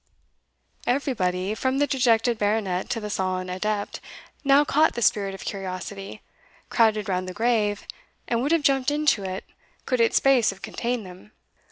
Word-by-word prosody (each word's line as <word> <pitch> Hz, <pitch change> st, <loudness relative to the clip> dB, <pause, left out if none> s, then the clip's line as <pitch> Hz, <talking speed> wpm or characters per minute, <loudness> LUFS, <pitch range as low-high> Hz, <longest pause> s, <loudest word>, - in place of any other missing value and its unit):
Everybody, 200 Hz, -8 st, 0 dB
from 260 Hz, +4 st, -1 dB
the 290 Hz, -, +3 dB
dejected 240 Hz, -4 st, +2 dB
Baronet 205 Hz, -3 st, 0 dB
to 230 Hz, -, -1 dB
the 210 Hz, -1 st, -5 dB
sullen 185 Hz, -2 st, -2 dB
adept, 205 Hz, +2 st, -2 dB, 0.4 s
now 280 Hz, +1 st, +5 dB
caught 310 Hz, +2 st, +3 dB
the 240 Hz, -, -3 dB
spirit 195 Hz, -2 st, +2 dB
of -, -, -10 dB
curiosity, 195 Hz, +1 st, -6 dB, 0.5 s
crowded 215 Hz, -3 st, +3 dB
round 185 Hz, -1 st, -1 dB
the 180 Hz, -, -8 dB
grave, 220 Hz, -3 st, +1 dB, 0.4 s
and 235 Hz, -1 st, 0 dB
would 285 Hz, +4 st, 0 dB
have 335 Hz, -3 st, +3 dB
jumped 270 Hz, -2 st, +3 dB
into 295 Hz, -8 st, +2 dB
it, 190 Hz, 0 st, -4 dB, 0.4 s
could 255 Hz, -3 st, +1 dB
its 230 Hz, -, +3 dB
space 265 Hz, -4 st, +4 dB
have 195 Hz, 0 st, -7 dB
contained 235 Hz, +1 st, -3 dB
them. 185 Hz, +3 st, -13 dB
215 Hz, 160 wpm, -25 LUFS, 195-255 Hz, 0.5 s, now